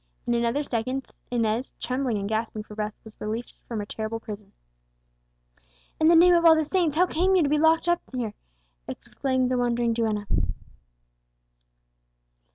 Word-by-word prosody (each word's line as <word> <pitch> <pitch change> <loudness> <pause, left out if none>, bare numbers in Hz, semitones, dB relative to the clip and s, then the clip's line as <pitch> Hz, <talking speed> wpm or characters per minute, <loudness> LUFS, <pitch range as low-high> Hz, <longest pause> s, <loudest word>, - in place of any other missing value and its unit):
In 240 - 0
another 235 +5 +1
second 255 0 -3 0.2
Inez, 230 +1 -1
trembling 255 -2 -1
and 200 0 -3
gasping 220 0 -2
for 210 - -12
breath, 210 0 -4
was 220 -1 -14
released 220 +3 -5
from 230 - -4
her - - -5
terrible 220 +2 -4
prison. 210 -2 -9 1.5
"In 315 - +4
the 335 - +7
name 350 +2 +7
of 340 -1 +4
all 325 -1 +8
the 315 -1 +1
saints, 335 -3 +1
how 355 +3 +5
came 370 +2 +1
you 360 - +4
to 285 - +1
be 300 +1 +2
locked 320 +2 +3
up 345 0 +2
here?" 240 -5 -3 0.5
exclaimed 260 -2 -2
the 250 - +1
wondering 240 -1 +1
duenna. 220 -3 -1
245 Hz, 165 wpm, -26 LUFS, 220-310 Hz, 1.5 s, all